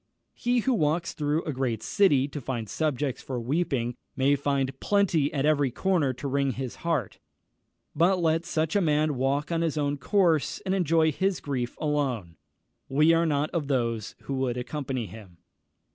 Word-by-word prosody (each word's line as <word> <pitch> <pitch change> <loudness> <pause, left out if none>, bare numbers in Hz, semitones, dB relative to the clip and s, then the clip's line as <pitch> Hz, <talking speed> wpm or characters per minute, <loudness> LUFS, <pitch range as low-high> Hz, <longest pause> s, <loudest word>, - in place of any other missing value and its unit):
He 245 0 +1
who 260 +3 +1
walks 165 -3 0
through 150 +2 -1
a 155 - -3
great 125 -4 -2
city 145 -10 +3
to 145 - -6
find 120 -3 -4
subjects 145 0 -1
for 130 -2 -4
weeping, 130 -2 -1 0.2
may 140 +2 +3
find 140 -1 -1
plenty 175 -8 +2
at 140 -3 0
every 145 -3 +3
corner 165 0 +1
to 130 +3 -6
wring 140 -1 0
his 130 -1 -5
heart; 160 - -2 0.8
but 185 +3 +4
let 165 -1 +2
such 160 -1 -1
a 205 - +4
man 155 -2 +2
walk 135 +4 -1
on 165 -1 +1
his 160 -2 -1 0.2
course, 165 -1 +2
and 190 - 0
enjoy 165 -4 +3
his 190 +4 0
grief 125 -4 -3
alone 130 - -1 0.5
we 150 +4 +4
are 165 0 +3
not 145 0 0
of 160 -5 -2
those 115 -5 -1
who 140 - -4
would 125 -2 -1
accompany 130 -1 -3
him. 100 -5 -12
145 Hz, 170 wpm, -27 LUFS, 130-165 Hz, 0.8 s, but